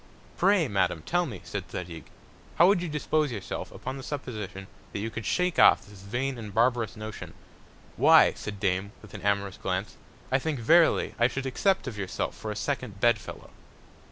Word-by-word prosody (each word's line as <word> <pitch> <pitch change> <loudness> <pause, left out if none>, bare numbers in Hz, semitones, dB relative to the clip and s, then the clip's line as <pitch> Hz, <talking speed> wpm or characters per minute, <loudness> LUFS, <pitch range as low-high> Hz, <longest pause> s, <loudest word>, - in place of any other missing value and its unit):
Pray, 190 -3 +3
Madam, 90 -6 0
tell 175 0 +1
me, 105 -9 -8
said - - -6
Zadig, 85 -3 -7 0.5
how 170 - +6
would 195 -2 +4
you 175 - -3
dispose 150 +1 0
of - - -5
yourself, 100 -4 -5
upon 130 +1 -6
the - - -7
Supposition, 105 -10 -6 0.3
that - - -3
you 110 +2 -3
could 110 0 -5
shake 180 0 +1
off - - +6
this 100 -2 -14
vain 120 +6 -3
and 105 -2 -7
barbarous 115 -2 +1
Notion? 110 -1 -8 0.6
Why, - - +7
said 105 -1 -7
Dame, 95 +1 -1
with 105 - -14
an 105 - -7
amorous 100 -1 0
Glance, 95 +2 -3 0.3
I 130 - +3
think 150 -1 -2
verily 165 +8 +4
I 120 - +5
should 135 +1 -4
accept 190 +8 +1
of 115 -6 -6
yourself 95 -2 -3
for 110 - -6
a 105 - -3
second 125 -8 -3
Bed 115 0 +4
fellow. - - -10
110 Hz, 190 wpm, -27 LUFS, 100-135 Hz, 0.6 s, Why